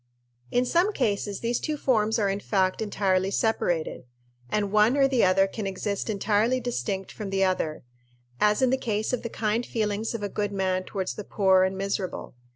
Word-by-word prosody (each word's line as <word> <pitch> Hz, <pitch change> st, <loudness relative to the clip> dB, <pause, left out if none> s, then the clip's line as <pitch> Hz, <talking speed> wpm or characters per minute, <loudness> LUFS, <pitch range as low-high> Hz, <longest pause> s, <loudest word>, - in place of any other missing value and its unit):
In 245 Hz, +1 st, +1 dB
some 345 Hz, +9 st, +2 dB
cases 205 Hz, -, -1 dB
these 235 Hz, +1 st, 0 dB
two 305 Hz, -1 st, -2 dB
forms 220 Hz, -6 st, +2 dB
are 210 Hz, -3 st, +1 dB
in 195 Hz, +1 st, -1 dB
fact 190 Hz, -1 st, 0 dB
entirely 195 Hz, -3 st, +1 dB
separated, 175 Hz, -, -1 dB, 0.4 s
and 205 Hz, +3 st, 0 dB
one 215 Hz, +5 st, +4 dB
or 275 Hz, -1 st, +5 dB
the 260 Hz, -3 st, +2 dB
other 190 Hz, +1 st, +4 dB
can 195 Hz, +1 st, -5 dB
exist 200 Hz, +2 st, -3 dB
entirely 215 Hz, +4 st, +1 dB
distinct 210 Hz, -6 st, -3 dB
from 210 Hz, -3 st, -6 dB
the 195 Hz, 0 st, +1 dB
other 185 Hz, -5 st, -1 dB, 0.6 s
as 210 Hz, +4 st, +3 dB
in 255 Hz, -, +4 dB
the 265 Hz, -, +2 dB
case 215 Hz, -2 st, -2 dB
of 250 Hz, -, 0 dB
the 235 Hz, -, -5 dB
kind 220 Hz, +1 st, -1 dB
feelings 220 Hz, -1 st, -2 dB
of 215 Hz, -, -5 dB
a -, -, 0 dB
good 205 Hz, 0 st, -2 dB
man 185 Hz, -1 st, -1 dB
towards 190 Hz, -2 st, -3 dB
the 210 Hz, -, -7 dB
poor 190 Hz, -2 st, +3 dB
and 190 Hz, 0 st, +1 dB
miserable. 195 Hz, -1 st, -3 dB
205 Hz, 190 wpm, -26 LUFS, 195-230 Hz, 0.6 s, or